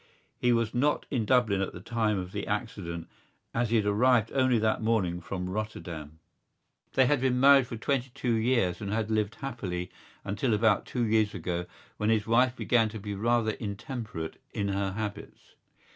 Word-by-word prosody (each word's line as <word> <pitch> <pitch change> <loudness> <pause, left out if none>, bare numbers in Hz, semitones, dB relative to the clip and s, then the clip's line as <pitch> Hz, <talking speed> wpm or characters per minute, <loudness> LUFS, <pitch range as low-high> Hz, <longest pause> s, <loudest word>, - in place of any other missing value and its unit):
He 125 - +3
was 115 -1 +1
not 140 +5 +1
in 120 -6 0
Dublin 110 -5 +3
at 95 - -2
the - - -8
time 110 +1 0
of 90 -1 -4
the - - -4
accident 85 0 -4 0.5
as 115 0 0
he 115 - +1
had 110 -2 +3
arrived 115 +2 +3
only 130 -2 +3
that 110 0 +1
morning 100 -6 +1
from 90 +1 -4
Rotterdam. 85 -7 -5 0.8
They 130 - +5
had 135 +1 +2
been 125 -1 +2
married 135 -1 +7
for 115 - -6
twenty 130 +2 -1
two 125 -3 0
years 110 -6 +1
and 100 -1 -3
had 110 0 -1
lived 110 -1 0
happily 95 -10 -4 0.3
until 105 +4 0
about 105 -1 +2
two 125 - -1
years 110 -2 +2
ago 90 0 -3 0.3
when 105 - 0
his 110 -2 +2
wife 120 +2 +3
began 115 -4 +2
to 110 0 -7
be 105 0 -5
rather 115 +2 +1
intemperate 105 -5 -6
in 100 -1 -1
her 100 -1 -1
habits. 105 0 -6
110 Hz, 180 wpm, -29 LUFS, 100-120 Hz, 0.8 s, married